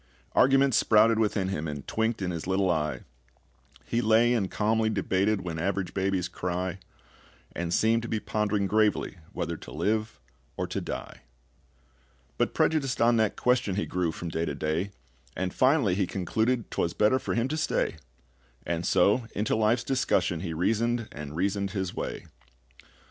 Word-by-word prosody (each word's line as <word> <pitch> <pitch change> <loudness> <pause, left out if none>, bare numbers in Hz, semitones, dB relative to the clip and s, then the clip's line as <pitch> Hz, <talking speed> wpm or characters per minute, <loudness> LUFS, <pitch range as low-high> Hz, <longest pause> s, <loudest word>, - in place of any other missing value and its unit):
Arguments 135 -1 +4
sprouted 110 +1 +4
within 105 -3 +1
him, 80 -4 -3
And 75 -2 -6
twinked 110 -2 -1
in 90 - -1
his 85 0 -5
little 95 -1 +2
eye; 75 -2 -1 0.8
He 120 - 0
lay 115 +2 +4
and 100 -6 0
calmly 110 +4 +1
debated 100 -1 +1
When 85 -3 -4
average 95 +1 -2
babies 95 -2 0
cry, 90 +1 -3 0.8
And 85 0 -3
seemed 115 +5 +3
to 120 - -5
be 110 - -1
pondering 105 -1 0
gravely 105 -2 +1
whether 85 -4 -3
to - - -11
live 110 -3 -1 0.4
or - - -1
to - - -4
die. - - -6 1.2
But - - 0
prejudiced 140 -5 +1
on 115 0 +4
that 110 -2 +1
question 125 -6 +1
He 105 - -1
grew 90 -2 -1
from 85 +1 -6
day 80 +1 -1
to 70 - -3
day, 80 +6 -1 0.5
And 95 0 -2
finally 130 - +3
he 95 0 0
concluded 110 +6 -1
'Twas 85 - -1
better 110 +5 +3
for - - -3
him 115 +2 +1
to 155 - -1
stay; 155 - 0 0.7
And 85 0 -2
so 110 +6 +3
into 105 +1 0
life's 110 +2 +2
discussion 95 -10 +1
he 85 -1 -4
reasoned 115 +7 0
and 75 0 -7
reasoned 100 +2 -1
his 95 -3 -2
way. - - -5
100 Hz, 165 wpm, -27 LUFS, 90-115 Hz, 1.2 s, Arguments